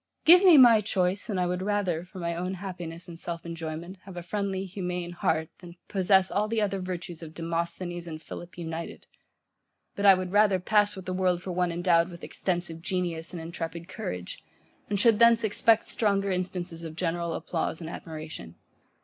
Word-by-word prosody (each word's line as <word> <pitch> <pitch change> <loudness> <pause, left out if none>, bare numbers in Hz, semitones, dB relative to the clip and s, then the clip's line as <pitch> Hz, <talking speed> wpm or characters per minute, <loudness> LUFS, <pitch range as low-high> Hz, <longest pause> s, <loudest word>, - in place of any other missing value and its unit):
Give 355 +4 +9
me 355 -5 +8
my 235 -5 +8
choice, 195 0 0
and 195 -3 -1
I 180 - +2
would 180 +1 -1
rather, 190 -4 -1
for 190 +1 -13
my 170 -1 -2
own 180 +2 -3
happiness 175 -3 -6
and 170 -1 -10
self 170 -1 -5
enjoyment, 170 +2 -6
have 190 -2 -10
a 175 - -5
friendly, 195 0 -2
humane 180 -2 -4
heart, 160 -2 0
than 175 -2 -12
possess 190 -1 +3
all 210 +1 +1
the 225 +1 0
other 200 -2 0
virtues 180 -2 -5
of 160 -1 -10
Demosthenes 170 +1 -3
and 155 -1 -6
Philip 175 +2 -10
united: 165 -1 -6 0.9
but 200 0 +2
I 195 - +9
would 185 -1 -4
rather 205 -1 +4
pass 205 +2 +3
with 190 -2 -9
the 185 - -3
world 180 -1 +1
for 185 - -4
one 180 0 0
endowed 170 0 +2
with 170 -1 -11
extensive 175 -3 -3
genius 175 -3 -2
and 175 - -6
intrepid 165 +1 -6
courage, 185 - -6 0.5
and 205 -1 0
should 225 0 +4
thence 235 -1 +6
expect 220 +1 +3
stronger 200 -2 +1
instances 180 -2 -3
of 160 -1 -7
general 170 -1 -1
applause 160 -1 -2
and 165 - -7
admiration. 155 - -8
180 Hz, 185 wpm, -28 LUFS, 170-195 Hz, 0.9 s, Give